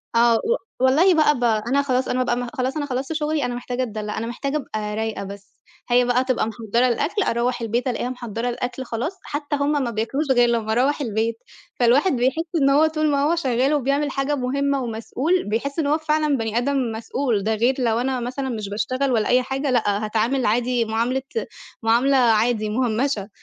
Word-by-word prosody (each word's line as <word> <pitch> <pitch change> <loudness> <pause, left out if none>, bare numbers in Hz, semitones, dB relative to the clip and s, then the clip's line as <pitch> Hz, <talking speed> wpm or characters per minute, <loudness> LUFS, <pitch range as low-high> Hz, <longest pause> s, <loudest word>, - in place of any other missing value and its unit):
آه، 235 0 +5
و 465 - +1 0.2
والله 290 +9 +5
بقى 300 -4 +3
ب - - -3
أنا 235 +4 +2
خلاص 260 -2 0
أنا 255 - 0
أبقى 250 - +1
أمّا 245 0 -2
خلاص 265 +1 -2
أنا 295 - -1
خلّصت 265 +2 -3
شُغلي 305 -2 -1
أنا 245 0 -3
محتاجة 245 +1 -3
أتدلّع، 215 -3 -5
أنا 230 - -3
محتاجة 275 +5 -2
أبقى 215 -7 -4
رايقة 220 -1 -3
بس 200 +1 -11 0.3
هي 245 0 +4
بقى 245 +1 +2
تبقى 255 -4 0
محضّرة 230 +2 0
الأكل 300 - 0
أروّح 245 -2 0
البيت 235 +3 -1
ألاقيها 245 0 -2
محضّرة 240 -2 -4
الأكل 250 +2 -4
خلاص 260 - -4
حتّى 290 0 -3
هم 285 +1 0
ما 240 - -2
بياكلوش 235 +7 -1
غير 245 -2 +4
لمّا 225 -2 0
أروّح 265 +6 +1
البيت، 225 -2 -1 0.4
فالواحد 255 +9 +4
بيحس 260 +6 +1 0.2
إن 275 - +4
هو 290 +3 +5
طول 310 -1 0
ما 280 0 +1
هو 315 +4 +2
شغّال 265 -3 +1
وبيعمل 285 +1 0
حاجة 275 +2 -1
مهمّة 280 +1 0
ومسؤول، 250 +9 -1
بيحس 280 +8 -2
إن 300 - +1
هو 300 +2 +3
فعلًا 305 -2 +1
بني 225 -1 -2
آدم 260 -1 0
مسؤول 225 -1 -2
ده 220 +2 +1
غير 240 +5 +2
لو 230 -2 +1
أنا 255 +1 -1
مثلًا 260 +3 -3
مش 215 -4 -4
باشتغل 255 +6 -1
ولا 220 -3 +1
أي 250 +1 +4
حاجة 270 +2 -2
لأ، 215 -3 +1
هاتعامل 230 +4 0
عادي 240 +2 +1
معاملة 230 +4 0 0.6
معاملة 245 +5 +3
عادي 225 -2 +2
مُهمّشة، 225 -1 -1
250 Hz, 195 wpm, -22 LUFS, 230-280 Hz, 0.6 s, آه